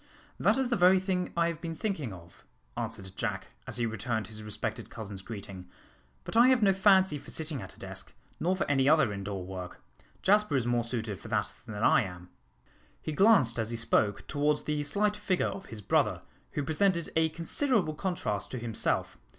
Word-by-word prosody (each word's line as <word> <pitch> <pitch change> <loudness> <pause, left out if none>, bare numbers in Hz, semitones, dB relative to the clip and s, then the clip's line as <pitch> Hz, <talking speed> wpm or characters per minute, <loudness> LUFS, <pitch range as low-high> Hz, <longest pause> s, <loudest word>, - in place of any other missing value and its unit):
"That - - +3
is 260 -2 0
the - - +4
very 185 -1 +6
thing 185 -1 -1
I 170 - +4
have 165 -2 -4
been 165 -1 -4
thinking 160 - -2
of," 85 -2 -13 0.3
answered 95 -1 -5
Jack, - - -3 0.2
as - - -6
he 120 - +1
returned 110 0 -2
his 110 +1 -8
respected 105 -1 -4
cousin's 100 -3 -7
greeting, 95 -4 -8 0.5
"but - - -6
I 235 +2 +7
have 255 -3 +4
no 195 -1 +5
fancy 190 -5 +4
for - - -12
sitting 155 -5 -3
at 95 - -9
a - - -18
desk, - - -7 0.3
nor 180 +3 +1
for 185 - 0
any 135 -1 +3
other 155 -9 +4
indoor 100 -1 -4
work. 90 -1 -7 0.4
Jasper 210 -4 +4
is 130 -3 +1
more 120 -1 +1
suited 115 -4 -4
for - - -11
that 105 -2 -1
than 110 - -6
I 135 - +6
am." 90 -4 -7 0.7
He 155 - -4
glanced 155 - +5
as 110 -1 -1
he 115 - -3
spoke 105 -2 +2
towards 150 +1 +1
the 150 -1 -1
slight 205 +8 +1
figure 200 -3 0
of 190 0 -5
his 110 -2 -8
brother, - - +1 0.3
who 145 - -1
presented 170 +3 +1
a 160 0 +3
considerable 170 - 0
contrast 150 - -2
to 130 - -5
himself. 115 -2 -1
145 Hz, 195 wpm, -30 LUFS, -, 0.7 s, I